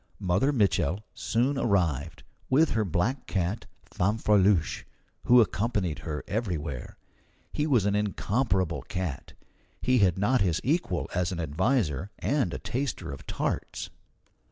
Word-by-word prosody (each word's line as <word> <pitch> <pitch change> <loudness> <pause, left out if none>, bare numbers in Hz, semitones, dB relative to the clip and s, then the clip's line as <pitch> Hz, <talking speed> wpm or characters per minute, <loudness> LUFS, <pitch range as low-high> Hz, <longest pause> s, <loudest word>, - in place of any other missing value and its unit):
Mother 95 +10 +1
Mitchel 100 - +1
soon 130 +5 0
arrived, 85 - 0 0.3
with 150 +5 +4
her 110 -1 +1
black 100 - -1
cat, 95 +3 -2 0.2
Fanfreluche, 100 -3 +2 0.4
who 125 +1 +7
accompanied 100 -6 0
her 75 -1 -5
everywhere. 85 - -3 0.6
He 150 - 0
was 125 -9 +3
an 100 - +2
incomparable 100 -3 0
cat. 90 -8 -5 0.5
He 125 0 +2
had 95 -4 +3
not 115 +6 +2
his 85 -4 +2
equal 135 - 0
as 90 0 0
an 90 - -4
adviser 85 - 0
and 140 -3 0
a - - -3
taster 130 - -3
of 70 - -9
tarts. - - -3
100 Hz, 130 wpm, -28 LUFS, 85-120 Hz, 0.6 s, who